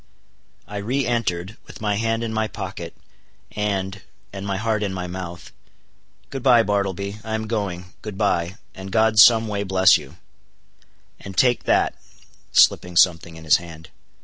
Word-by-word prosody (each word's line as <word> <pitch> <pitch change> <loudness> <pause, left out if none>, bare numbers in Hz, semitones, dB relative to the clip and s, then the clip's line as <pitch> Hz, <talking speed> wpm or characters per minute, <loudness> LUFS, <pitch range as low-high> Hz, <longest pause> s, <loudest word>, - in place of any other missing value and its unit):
I 105 - -6
re 125 +7 -1
entered, 105 -4 -2
with - - -12
my 105 -1 0
hand 115 +1 -1
in 115 -1 -3
my 110 0 0
pocket—and—and 100 -2 -7
my 100 -1 -1
heart 110 0 -1
in 100 -2 -2
my 90 -1 -4
mouth. 90 -1 -7 0.8
"Good 135 - -5
bye, 120 -3 +5
Bartleby; 100 0 -2
I 110 0 -3
am 110 0 -3
going—good 100 -2 -5
bye, 95 -4 0 0.2
and 95 0 -9
God 110 0 +3
some 115 0 +7
way 100 -1 -2
bless 95 -2 +4
you; - - -14 1.0
and 95 -2 -10
take 125 +1 +3
that," - - +2 0.6
slipping 90 -1 +3
something 85 -2 +3
in 80 - -11
his 80 - +5
hand. 80 -2 -11
100 Hz, 150 wpm, -22 LUFS, 90-110 Hz, 1.0 s, some